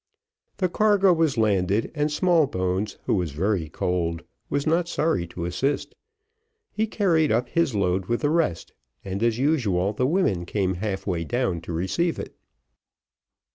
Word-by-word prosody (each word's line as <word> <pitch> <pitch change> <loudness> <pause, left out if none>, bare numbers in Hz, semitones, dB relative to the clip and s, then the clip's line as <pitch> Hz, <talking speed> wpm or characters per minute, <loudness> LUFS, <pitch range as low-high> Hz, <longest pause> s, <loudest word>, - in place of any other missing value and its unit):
The 185 - +1
cargo 200 0 +4
was 160 -6 +1
landed, 100 -1 +1
and 150 -1 0
Smallbones 110 - +1
who - - +1
was 90 -8 -1
very 90 0 -1
cold 85 0 -2 0.3
was 140 0 -1
not 165 +2 +2
sorry 150 - 0
to 85 0 -6
assist. 135 +11 -1 0.8
He 220 +1 -1
carried 170 -8 +2
up 120 +2 +1
his 170 -7 +1
load 95 -1 0
with 120 0 -1
the 145 - +1
rest, 155 - 0 0.3
and 95 +1 -4
as 115 -1 +2
usual 110 - +1
the 125 +4 0
women 120 - +1
came 95 -2 0
half 100 -3 -3
way 85 -4 -1
down 110 -4 -1
to 85 - -7
receive 95 - -1
it. - - -7
110 Hz, 155 wpm, -24 LUFS, -, 0.8 s, cargo